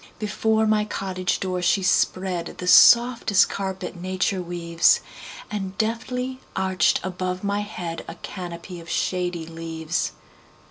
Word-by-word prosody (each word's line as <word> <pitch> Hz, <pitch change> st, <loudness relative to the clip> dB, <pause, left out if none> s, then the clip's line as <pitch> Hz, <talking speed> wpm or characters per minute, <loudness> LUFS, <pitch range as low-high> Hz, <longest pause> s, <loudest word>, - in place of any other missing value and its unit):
Before 220 Hz, +1 st, +1 dB
my 215 Hz, -1 st, +3 dB
cottage 190 Hz, -3 st, -2 dB
door 185 Hz, -1 st, -2 dB
she 180 Hz, +3 st, +2 dB
spreadThe 185 Hz, -1 st, 0 dB
softest 235 Hz, -2 st, +6 dB
carpet 190 Hz, -1 st, -4 dB
nature 185 Hz, +1 st, -1 dB
weaves, 170 Hz, -1 st, +2 dB, 0.5 s
And 195 Hz, -2 st, -4 dB
deftly 250 Hz, +3 st, -2 dB, 0.2 s
arched 190 Hz, -3 st, +2 dB
above 185 Hz, 0 st, -3 dB
my 200 Hz, 0 st, 0 dB
headA 170 Hz, -5 st, -6 dB
canopy 175 Hz, -1 st, -7 dB
of 165 Hz, 0 st, -12 dB
shady 175 Hz, -2 st, -1 dB
leaves. 165 Hz, 0 st, -3 dB
185 Hz, 110 wpm, -24 LUFS, 175-205 Hz, 0.5 s, softest